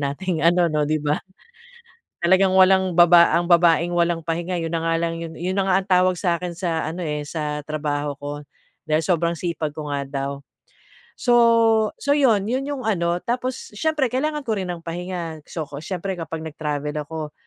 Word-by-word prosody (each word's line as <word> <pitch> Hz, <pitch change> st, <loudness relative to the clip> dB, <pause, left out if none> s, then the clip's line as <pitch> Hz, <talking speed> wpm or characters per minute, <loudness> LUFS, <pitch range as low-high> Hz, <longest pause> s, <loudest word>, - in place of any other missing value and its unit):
nating 180 Hz, 0 st, -3 dB
ano 170 Hz, +2 st, +4 dB
'no, 150 Hz, -1 st, 0 dB
'di 155 Hz, -, +2 dB
ba? 150 Hz, +1 st, 0 dB, 1.0 s
Talagang 185 Hz, +2 st, +4 dB
walang 190 Hz, -1 st, +4 dB
baba 175 Hz, 0 st, +7 dB
ang 175 Hz, -, -1 dB
babaeng 170 Hz, 0 st, +4 dB
walang 170 Hz, -1 st, +1 dB
pahinga, 170 Hz, +2 st, -2 dB
'yon 165 Hz, 0 st, -4 dB
na 165 Hz, 0 st, -1 dB
nga 165 Hz, 0 st, +1 dB
lang 165 Hz, 0 st, -1 dB
'yon, 165 Hz, -1 st, -6 dB
'yon 185 Hz, +2 st, -2 dB
na 195 Hz, -, +2 dB
nga 185 Hz, -, +3 dB
ang 195 Hz, -, -8 dB
tawag 185 Hz, 0 st, +3 dB
sa 175 Hz, -3 st, +1 dB
akin 180 Hz, -1 st, -5 dB
sa 170 Hz, -4 st, -1 dB
ano 180 Hz, +2 st, -6 dB
eh, 150 Hz, -1 st, -3 dB
sa 150 Hz, -1 st, -4 dB
trabaho 145 Hz, -1 st, -2 dB
ko, 145 Hz, 0 st, -5 dB, 0.5 s
dahil 155 Hz, +1 st, +1 dB
sobrang 170 Hz, -1 st, +1 dB
sipag 165 Hz, -3 st, -3 dB
ko 150 Hz, -1 st, -6 dB
nga 140 Hz, -1 st, -1 dB
daw. 140 Hz, 0 st, -3 dB, 0.9 s
So, 245 Hz, -2 st, +1 dB, 0.6 s
so, 285 Hz, -, +1 dB
'yon, 230 Hz, -9 st, +3 dB
'yon 260 Hz, +4 st, -1 dB
'yong 275 Hz, -3 st, -4 dB
ano, 170 Hz, -5 st, +1 dB
tapos 250 Hz, -1 st, -3 dB
siyempre 300 Hz, +2 st, +1 dB
kailangan 300 Hz, +1 st, -1 dB
ko 220 Hz, -2 st, 0 dB
rin 185 Hz, -2 st, -4 dB
ng 170 Hz, -1 st, -7 dB
pahinga. 170 Hz, -2 st, -5 dB
So, 160 Hz, -3 st, -4 dB
'ko 145 Hz, +1 st, -8 dB
siyempre 190 Hz, +1 st, -3 dB
kapag 165 Hz, -1 st, -5 dB
nagtravel 150 Hz, -1 st, -4 dB
ako, 155 Hz, 0 st, -6 dB
170 Hz, 190 wpm, -22 LUFS, 155-185 Hz, 1.0 s, baba